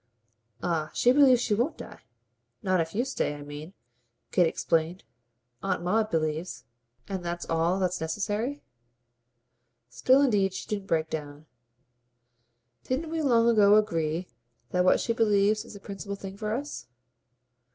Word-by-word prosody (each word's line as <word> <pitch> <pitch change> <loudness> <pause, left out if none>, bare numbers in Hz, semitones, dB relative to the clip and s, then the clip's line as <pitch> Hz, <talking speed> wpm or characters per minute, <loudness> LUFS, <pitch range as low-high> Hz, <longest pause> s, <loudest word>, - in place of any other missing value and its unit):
"Ah 160 -3 -1
she 245 - +4
believes 260 -3 +6
she 230 - 0
won't 245 +9 0
die. - - -10 0.6
Not 185 -2 +2
if 165 +2 -5
you 240 +4 +1
stay. 205 - -2
I 145 - -9
mean," 145 +4 -9 0.6
Kate 175 -2 +4
explained, 165 +2 -1 0.6
"Aunt 185 -3 -1
Maud 215 +4 +1
believes." 160 +1 -2 0.4
"And 190 -2 -4
that's 170 0 -4
all 165 +3 +1
that's 185 -2 -1
necessary?" 210 - -2 1.3
Still 255 - +4
indeed 200 -7 +2
she - - -6
didn't 200 -2 -4
break 160 -2 0
down. 150 -1 -6 1.4
"Didn't 305 +5 -2
we 325 -1 -1
long 235 -5 +3
ago 210 -3 +6
agree 170 -5 0 0.4
that 180 0 +2
what 185 - +4
she 230 - 0
believes 210 -1 +2
is - - -12
the - - -9
principal 200 0 -6
thing 195 -1 -8
for 210 +1 -4
us?" 280 +6 -4
195 Hz, 145 wpm, -27 LUFS, 165-225 Hz, 1.4 s, believes